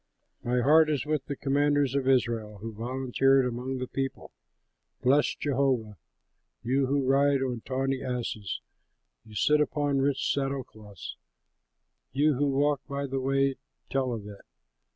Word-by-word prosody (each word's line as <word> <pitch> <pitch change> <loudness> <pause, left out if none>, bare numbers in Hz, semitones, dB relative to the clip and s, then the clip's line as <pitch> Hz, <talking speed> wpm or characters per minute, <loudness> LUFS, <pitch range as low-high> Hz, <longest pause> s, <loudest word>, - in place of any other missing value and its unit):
"My 125 +1 +1
heart 155 +4 +5
is 150 -2 0
with 150 -2 -1
the 140 - -3
commanders 145 -1 +1
of 140 -2 0
Israel, 115 -5 +1
Who 110 +3 -7
volunteered 130 +3 +2
among 125 +2 -3
the 130 - -3
people. 135 +1 -4 0.7
Bless 140 +4 +3
Jehovah! 130 -6 0 0.7
You 135 +2 +1
who 140 0 +1
ride 135 0 +3
on 125 -3 -3
tawny 135 0 -1
asses, 120 -6 -3 0.7
Who 105 - -13
sit 150 +8 +3
upon 145 -2 0
rich 135 0 +1
saddle 135 -1 -1
cloths; 105 - -11 1.0
You 150 +2 +3
who 145 +2 +1
walk 140 0 +1
by 140 0 -3
the 135 0 -2
way, 135 0 +1 0.3
tell 135 -2 0
of 110 -4 -5
it. 100 -1 -10
135 Hz, 145 wpm, -28 LUFS, 125-140 Hz, 1.0 s, heart